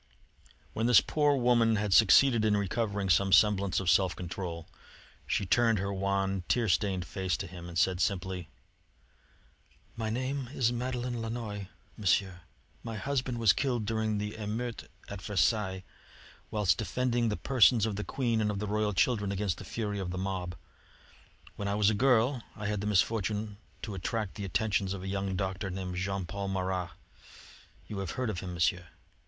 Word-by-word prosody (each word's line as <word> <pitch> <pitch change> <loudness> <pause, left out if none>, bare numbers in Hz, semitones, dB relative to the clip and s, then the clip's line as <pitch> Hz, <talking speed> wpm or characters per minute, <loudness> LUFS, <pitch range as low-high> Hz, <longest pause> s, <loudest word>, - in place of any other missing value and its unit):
When 115 +2 0
this 125 - +8
poor 145 -2 +2
woman 120 -3 +3
had 105 -2 0
succeeded 115 +3 +6
in 105 -1 +3
recovering 100 0 -1
some 95 +2 +3
semblance 100 -2 +4
of 95 - -5
self 90 0 +3
control, 85 -2 -6 0.6
she - - 0
turned 115 +1 +3
her 100 +1 -2
wan, 95 -1 -1
tear 120 -2 +2
stained 95 0 +1
face 95 -2 -2
to - - -5
him 85 -1 -9
and 85 - -6
said 90 +1 +2
simply: 90 -3 -2 1.5
"My 110 -1 -3
name 130 +2 -2
is 120 -1 +2
Madeleine 125 -1 -3
Lannoy, 110 -4 -5 0.3
Monsieur. 95 -2 +1 0.4
My 115 -2 -6
husband 130 0 -2
was 115 -4 +5
killed 125 -6 -1
during 110 0 -1
the 105 +1 -3
emeutes 110 +2 -4 0.2
at 100 -2 -7
Versailles, 95 -1 0 0.7
whilst 100 -7 +1
defending 120 -2 0
the 105 - -2
persons 125 -4 +4
of 110 -2 -2
the 105 - -3
Queen 115 -3 0
and 105 - +1
of 105 - -2
the 105 - -3
royal 105 0 0
children 105 +1 +1
against 95 -2 -2
the - - -7
fury 105 -3 -3
of 95 -2 -3
the 90 - -4
mob. 90 -2 -3 1.0
When 100 - -3
I 100 - 0
was 105 0 +4
a - - 0
girl 125 +2 +3
I 105 - -7
had 105 -1 -1
the 105 - -2
misfortune 105 +1 0 0.3
to 105 - -4
attract 100 +2 -3
the 100 - -6
attentions 100 0 0
of 95 - -8
a - - -5
young 95 0 -2
doctor 95 +1 -2
named 90 -1 -5
Jean 95 0 -2
Paul 100 +3 -4
Marat. 95 -2 -2 1.0
You 105 - -6
have 95 -3 -3
heard 125 -3 0
of 90 - -4
him, 90 -1 -6
Monsieur?" 90 +1 +1
105 Hz, 175 wpm, -30 LUFS, 95-115 Hz, 1.5 s, this